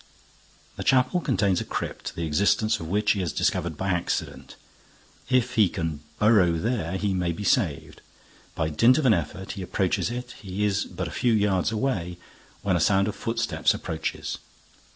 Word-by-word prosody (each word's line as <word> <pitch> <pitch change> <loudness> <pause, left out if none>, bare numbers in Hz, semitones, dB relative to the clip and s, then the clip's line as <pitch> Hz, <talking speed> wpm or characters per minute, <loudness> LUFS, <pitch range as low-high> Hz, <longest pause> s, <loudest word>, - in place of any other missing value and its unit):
The - - -4
chapel 130 +6 +3
contains 100 - +1
a - - -2
crypt, - - -5
the 85 - -2
existence 100 +7 +2
of 80 - -6
which 105 +4 +2
he 100 - 0
has 90 -5 -1
discovered 80 -3 -1
by 95 +4 -2
accident. 90 -2 -2 0.7
If 125 -1 +2
he 110 -6 +4
can 80 -4 -3 0.2
burrow 105 -6 +4
there, 95 -1 -1
he 100 0 0
may 90 -2 0
be 95 +5 -5
saved. 95 - 0 0.5
By 80 -1 0
dint 115 - +5
of 155 - 0
an 120 - +6
effort, 95 +2 -3
he 100 - -6
approaches 95 +2 0
it, 125 +1 -5
he 100 +1 -2
is 100 0 0
but 90 -1 -5
a - - -7
few 120 +8 +1
yards 100 -2 +2
away, 105 -7 -2 0.5
when 95 -2 +2
a - - +2
sound 100 +3 +3
of - - -5
footsteps 115 - 0
approaches. 80 -1 -4
100 Hz, 175 wpm, -25 LUFS, 85-110 Hz, 0.7 s, an